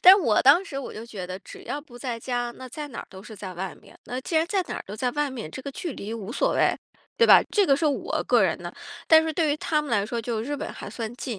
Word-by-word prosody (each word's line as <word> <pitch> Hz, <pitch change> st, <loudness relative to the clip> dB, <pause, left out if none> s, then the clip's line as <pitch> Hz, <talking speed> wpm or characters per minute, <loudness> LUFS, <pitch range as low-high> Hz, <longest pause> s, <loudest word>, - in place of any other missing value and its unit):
但 370 Hz, +2 st, +11 dB
是 400 Hz, -, +2 dB
我 225 Hz, -9 st, +3 dB
当 295 Hz, +9 st, +7 dB
时 275 Hz, -7 st, -5 dB
我 275 Hz, -, -6 dB
就 220 Hz, -, -7 dB
觉 200 Hz, -6 st, -6 dB
得， 185 Hz, +1 st, -5 dB
只 -, -, -12 dB
要 290 Hz, -, -3 dB
不 250 Hz, -5 st, -14 dB
在 245 Hz, -3 st, -3 dB
家， 245 Hz, 0 st, -2 dB
那 260 Hz, 0 st, -9 dB
在 295 Hz, +4 st, -6 dB
哪 245 Hz, -, -9 dB
儿 -, -, -10 dB
都 190 Hz, -1 st, -11 dB
是 215 Hz, +1 st, -10 dB
在 190 Hz, -2 st, -7 dB
外 190 Hz, +2 st, -4 dB
面。 -, -, -17 dB
那 250 Hz, +1 st, -4 dB
既 325 Hz, -, -5 dB
然 320 Hz, +1 st, +3 dB
在 385 Hz, 0 st, +1 dB
哪 -, -, -3 dB
儿 -, -, -5 dB
都 205 Hz, +2 st, -7 dB
在 250 Hz, +2 st, 0 dB
外 295 Hz, -1 st, 0 dB
面， 235 Hz, -11 st, -6 dB
这 260 Hz, -, -7 dB
个 280 Hz, -, -5 dB
距 330 Hz, +2 st, -4 dB
离 215 Hz, 0 st, -6 dB
无 220 Hz, 0 st, -6 dB
所 -, -, +1 dB
谓， -, -, +3 dB, 0.4 s
对 465 Hz, -, +5 dB
吧， -, -, +9 dB
这 410 Hz, -2 st, +3 dB
个 275 Hz, -3 st, +5 dB
是 315 Hz, -, -1 dB
我 285 Hz, -, 0 dB
个 -, -, +5 dB
人 -, -, +2 dB
的。 -, -, -7 dB, 0.3 s
但 320 Hz, 0 st, +8 dB
是 320 Hz, 0 st, -1 dB
对 315 Hz, -1 st, +2 dB
于 295 Hz, -, -1 dB
他 305 Hz, -1 st, +1 dB
们 290 Hz, -, -6 dB
来 205 Hz, -3 st, +2 dB
说， 230 Hz, +2 st, -3 dB
就 230 Hz, -1 st, -2 dB
日 290 Hz, +5 st, -3 dB
本 -, -, -5 dB
还 -, -, -8 dB
算 225 Hz, -1 st, -5 dB
近， 245 Hz, -5 st, -4 dB
255 Hz, 330 characters per minute, -26 LUFS, 220-300 Hz, 0.4 s, 但